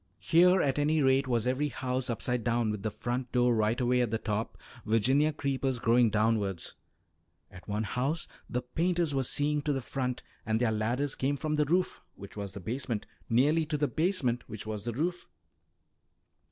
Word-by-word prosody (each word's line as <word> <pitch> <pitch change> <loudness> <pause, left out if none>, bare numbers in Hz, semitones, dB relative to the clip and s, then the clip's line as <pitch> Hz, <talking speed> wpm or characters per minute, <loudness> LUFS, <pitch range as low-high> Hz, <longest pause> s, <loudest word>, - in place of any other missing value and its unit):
Here 180 +2 +4
at 135 0 +1
any 155 +2 +2
rate 135 +1 +3
was 120 -2 +1
every 130 +4 +1
house 130 -2 -2
upside 120 0 -1
down 115 -1 +1
with 105 -2 -4
the 110 - -1
front 125 +3 -4
door 125 -1 +3
right 110 +2 +1
away 125 0 +2
at 120 - +1
the 115 - 0
top, 110 0 -3 0.3
Virginia 130 +8 +3
creepers 135 -3 -1
growing 115 0 +4
downwards; 105 -4 0 0.8
at 90 -1 -13
one 105 +1 -1
house 135 +8 -2 0.2
the 125 - -2
painters 170 +4 0
were 135 - +1
seeing 145 +3 +1
to 150 - -1
the 135 - -1
front 125 +1 -3 0.2
and 110 -1 0
their 120 -2 +2
ladders 120 +6 0
came 140 +2 -1
from 155 +1 -1
the 150 0 +2
roof 180 +5 0
(which 100 0 -11
was 100 -2 -5
the 100 - -6
basement) 115 +2 -3 0.2
nearly 145 +8 +3
to 150 -1 -1
the 145 0 +1
basement 155 -9 0
(which 110 -1 -6
was 105 -1 -5
the 120 - -2
roof). 175 +8 -2
125 Hz, 185 wpm, -30 LUFS, 110-145 Hz, 0.8 s, Here